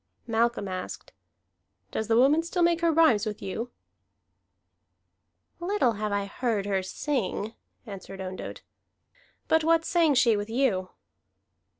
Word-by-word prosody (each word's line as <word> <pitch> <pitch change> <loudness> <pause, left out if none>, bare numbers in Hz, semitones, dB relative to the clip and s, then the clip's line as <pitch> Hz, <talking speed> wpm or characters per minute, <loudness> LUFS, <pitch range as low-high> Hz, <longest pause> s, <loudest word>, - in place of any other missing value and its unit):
Malcolm 230 -2 0
asked: 185 -1 -6 0.8
"Does 220 - -2
the 225 0 +3
woman 280 +6 +5
still 345 +1 -1
make 340 0 +3
her 335 -1 +3
rhymes 300 -10 +4
with 210 -1 -4
you?" 220 +5 -4 1.9
"Little 350 - +1
have 215 -1 -3
I 200 0 0
heard 215 -1 -2
her 195 -2 0
sing," 220 0 -2 0.3
answered 195 -2 -9
Ondott. 185 0 -6 0.8
"But 320 0 +3
what 330 0 +3
sang 330 -5 +3
she 235 -3 +5
with 205 +1 -3
you?" 225 -7 +1
230 Hz, 125 wpm, -27 LUFS, 200-315 Hz, 1.9 s, woman